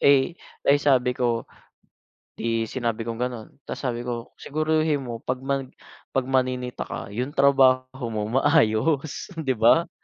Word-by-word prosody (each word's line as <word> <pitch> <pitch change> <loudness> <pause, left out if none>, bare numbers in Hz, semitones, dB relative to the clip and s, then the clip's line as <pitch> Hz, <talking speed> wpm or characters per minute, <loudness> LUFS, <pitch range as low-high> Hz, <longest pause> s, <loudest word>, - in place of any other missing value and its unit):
eh, 140 +3 +5 0.3
ay 145 +1 +5
sabi 130 -3 +3
ko, 120 -2 0 0.9
di 115 -1 -1
sinabi 115 -3 -2
kong 115 - -4
ganon. 120 -2 -3 0.2
Tapos, - - -6
sabi 120 -2 -2
ko, 120 -1 -5
"Siguruhin 155 0 0
mo 120 -3 -5
'pag 130 +3 -3
mag 135 0 -1 0.5
'pag 135 -1 +1
maninita 125 -1 0
ka - - -6
yung 125 +7 -3
trabaho 130 -2 +3
mo 105 - -1 0.2
maayos, 145 - +2
'di 155 -6 -1
ba?" 120 +10 +4
130 Hz, 145 wpm, -25 LUFS, 120-140 Hz, 0.9 s, eh